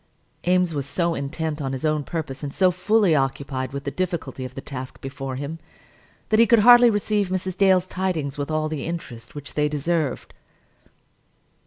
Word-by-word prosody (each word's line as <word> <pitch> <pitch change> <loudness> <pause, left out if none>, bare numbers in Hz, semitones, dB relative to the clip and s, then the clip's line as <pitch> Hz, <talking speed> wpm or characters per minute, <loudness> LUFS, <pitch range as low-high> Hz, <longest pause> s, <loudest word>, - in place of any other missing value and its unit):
Eames 180 -2 +3
was 140 -2 -3
so 170 +4 0
intent 155 +1 -3
on 135 -1 -2
his 135 +3 -3
own 155 -1 +1
purpose, 155 -4 -5
and 145 -2 -4
so 185 +4 +3
fully 200 +1 +3
occupied 135 -2 -1
with 140 0 -5
the 140 - -3
difficulty 170 -8 -3
of 130 0 -7
the - - -5
task 130 -1 -7
before 135 -1 -5
him, 145 +5 -5 0.7
that 220 - +3
he 230 - +6
could 235 - +6
hardly 240 0 +9
receive 205 -2 0
Mrs. 185 0 -2
Dale's 190 -2 +4
tidings 180 -7 -2
with 145 0 -4
all 155 0 0
the 155 -2 -4
interest 120 -9 -7
which 145 0 -8
they 150 0 +1
deserved. 150 -1 -2
155 Hz, 180 wpm, -23 LUFS, 140-185 Hz, 0.7 s, hardly